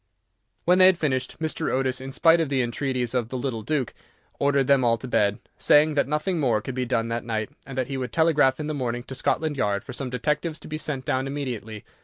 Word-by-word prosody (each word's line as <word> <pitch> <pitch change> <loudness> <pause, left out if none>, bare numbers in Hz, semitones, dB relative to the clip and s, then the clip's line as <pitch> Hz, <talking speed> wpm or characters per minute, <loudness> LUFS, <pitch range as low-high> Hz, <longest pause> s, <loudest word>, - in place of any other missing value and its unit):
When 180 +2 +4
they 185 - +9
had 190 -2 +4
finished, 130 -5 -1
Mr. 160 -1 -2
Otis, 130 -1 0
in 135 +1 -6
spite 165 +4 +4
of 160 - -1
the 135 -2 +1
entreaties 125 0 -2
of 120 -3 -1
the 130 - -4
little 125 -3 -3
Duke, 130 +1 -1 0.5
ordered 140 -1 +2
them 135 -1 +4
all 115 -1 +3
to 130 - -8
bed, 105 -4 +2 0.2
saying 150 +1 +5
that 140 -2 +1
nothing 155 +4 -1
more 125 -7 +2
could 130 +5 -6
be 125 0 -2
done 115 -2 0
that 115 0 -2
night, 110 -2 -3 0.2
and 135 -1 -8
that 130 - +1
he 135 +1 -4
would 125 -1 -4
telegraph 155 -5 +3
in 155 - -3
the 155 - -2
morning 120 -3 -2
to 135 - -8
Scotland 150 +2 -1
Yard 100 -4 0
for 125 - -8
some 130 0 -4
detectives 150 +5 -1
to - - -10
be 155 0 -4
sent 135 -5 -3
down 130 +1 0
immediately. 120 -7 -5
130 Hz, 240 wpm, -25 LUFS, 120-150 Hz, 0.5 s, they